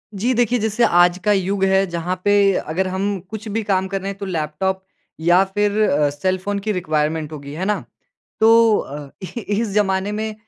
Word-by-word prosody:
जी 235 +6 0
देखिए, 245 0 +2
जैसे 220 +2 0
आज 175 -3 +4
का 210 - +3
युग 195 0 0
है, 190 0 +3
जहाँ 175 +1 -3
पे 205 -1 +4 0.2
अगर 185 +3 0
हम 195 +1 -2
कुछ 220 +1 -7
भी 220 +2 -2
काम 190 -2 0
कर 195 0 -3
रहे 195 - -4
हैं 200 - -6
तो 200 - -6
लैपटॉप 185 +2 -2 0.4
या 175 +4 +4
फिर 205 0 +1
अ, 145 0 +2
सेलफ़ोन 185 +6 -2
की 215 +2 -2
रिक्वायरमेंट 155 -3 -1
होगी, 145 -1 -8
है 180 +5 -3
ना? 210 0 -1 0.6
तो 225 -1 +6
अ, 145 0 -7
इ 235 +6 -6 0.2
इस 230 -1 0
ज़माने 195 -1 +1
में 215 0 -3
190 Hz, 195 wpm, -20 LUFS, 175-210 Hz, 0.6 s, तो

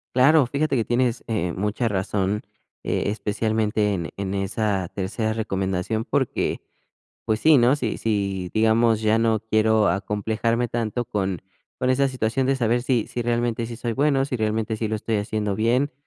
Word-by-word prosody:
Claro, 140 +2 +6
fíjate 140 +3 0
que 115 - +2
tienes, 120 0 0
eh, 95 -7 -1
mucha 105 +5 -1
razón, 100 +1 -1 0.4
eh, - - -1
especialmente, 105 0 0
en 85 -3 -3
en 100 0 -3
esa 100 -1 -1
tercera 105 +3 -2
recomendación, 95 -1 -2
porque, - - -1 0.7
pues 110 -1 0
sí, 155 +1 +6
¿no? 120 +3 +4
Si 120 -7 -2
si, 100 -4 -2
digamos, 110 0 +3
ya 110 0 +3
no 115 -1 +2
quiero 110 -1 +2
acomplejarme 110 +4 0
tanto 120 +1 -2
con 95 -5 -2 0.4
con 125 - +1
esa 135 +2 +3
situación, 130 0 -1
de 135 - +2
saber 120 -1 +1
si 125 -4 +1
si 120 - -4
realmente, 120 -1 0
sí 115 0 -7
soy 120 0 -3
bueno, 135 +1 +2
si 135 -2 -2
realmente, 110 0 -1
sí 110 0 -2
lo 110 - -1
estoy 110 +1 -2
haciendo 105 -1 -2
bien, 120 +7 +1
110 Hz, 170 wpm, -23 LUFS, 105-120 Hz, 0.7 s, Claro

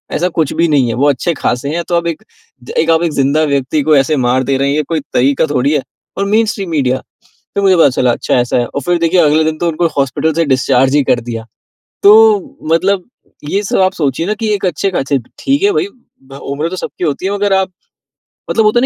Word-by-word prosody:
ऐसा 180 +3 0
कुछ 155 -4 0
भी 170 +2 +1
नहीं 140 -5 +2
है। - - -1
वो 140 +4 +2
अच्छे 145 +5 0
ख़ासे 125 -2 -2
हैं, 170 - -2
तो 175 - +1
आप 170 0 0
एक 165 -2 -4 0.7
आप 165 +1 +2
एक 170 - 0
ज़िंदा 140 +3 +1
व्यक्ति 140 0 0
को 155 +1 +3
ऐसे 135 +3 +2
मार 130 +2 +2
दे 135 +1 0
रहे 140 +1 0
हैं, 140 - 0
ये 155 - 0
कोई 160 +2 -2
तरीका 135 +4 +2
थोड़ी 130 +3 +1
है? 145 - +1 0.4
और 200 - 0
मेनस्ट्रीम 210 -2 0
मीडिया 135 -5 0 0.6
फिर 200 - 0
मुझे 190 -1 +5
पता 160 - +5
चला 125 -1 +1
अच्छा - - -2
ऐसा 120 0 0
है 120 - +1
और 140 - -5
फिर 175 +6 0
देखिए 170 +2 +2
अगले 155 0 +3
दिन 155 0 -1
तो 170 - -1
उनको 165 +1 0
हॉस्पिटल 140 +3 0
से 165 +2 +1
डिस्चार्ज 130 -1 +2
ही 145 - +3
कर 125 - +2
दिया। 115 -1 -6 0.6
तो 200 - +8 0.6
मतलब 185 +2 +1 0.5
ये 200 - 0
सब - - -1
आप 185 0 +3
सोचिए 150 -1 -1
ना 210 - 0
कि 225 - -1
एक 200 - -4
अच्छे 185 +3 -1
ख़ासे 140 -5 -1 0.2
ठीक 275 +4 0
है 405 +1 +3
भाई 420 -2 0 0.7
उम्र 150 +4 -2
तो 185 - -5
सबकी 180 - -5
होती 155 +3 -2
है, 195 - -1
मगर 205 0 0
आप। 190 -1 +1 0.8
मतलब 225 - +2
होता 215 +3 +3
है - - 0
155 Hz, 235 wpm, -14 LUFS, 135-185 Hz, 0.8 s, तो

